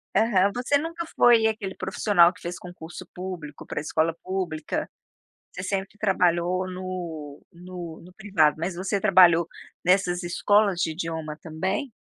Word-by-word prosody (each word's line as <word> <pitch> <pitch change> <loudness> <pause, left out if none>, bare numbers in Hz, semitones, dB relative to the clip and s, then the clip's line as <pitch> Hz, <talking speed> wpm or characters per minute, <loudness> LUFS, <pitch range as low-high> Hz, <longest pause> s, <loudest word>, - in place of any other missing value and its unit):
Aham, 200 -2 +3
você 255 +3 +2
nunca 335 +2 -4
foi 235 -2 +6
aquele 210 -3 -3
profissional 190 -2 +3
que 205 - -18
fez 175 +1 -5
concurso 175 -2 -10
público 180 -5 -7
pra - - -4
escola 160 +2 0
pública, 180 -5 -3 0.6
você 180 - -6
sempre 195 +1 -3
trabalhou 180 -2 +1
no 175 -6 -6
no 175 -2 -9
no 180 - -14
privado. 185 -8 +2
Mas 170 +3 -3
você 195 +3 -2
trabalhou 170 -3 +6 0.4
nessas 180 0 +2
escolas 200 +2 +2
de 160 - +1
idioma, 160 -2 -4
também? 190 - -3
180 Hz, 140 wpm, -25 LUFS, 170-195 Hz, 0.6 s, foi